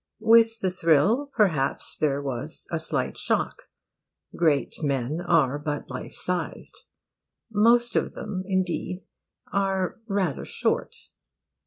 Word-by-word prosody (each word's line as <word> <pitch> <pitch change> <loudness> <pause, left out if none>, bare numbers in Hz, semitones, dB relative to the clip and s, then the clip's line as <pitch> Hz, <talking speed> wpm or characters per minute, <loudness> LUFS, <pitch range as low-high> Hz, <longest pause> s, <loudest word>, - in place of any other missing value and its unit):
With 225 0 +5
the 185 - +1
thrill, 185 - +3
perhaps, 165 - +1
there 145 -2 0
was 135 +3 -4
a 165 - 0
slight 155 -5 -2
shock. - - -1 0.7
Great 155 -4 +1
men 140 +2 -1
are 150 -5 +2
but 145 -1 -4
life - - -7
sized. 180 -2 -3 0.8
Most 235 +3 +4
of - - 0
them, 200 -3 -4
indeed, 185 -1 -1 0.5
are 195 -1 0
rather 195 - -1
short. - - -1
175 Hz, 115 wpm, -26 LUFS, 145-200 Hz, 0.8 s, With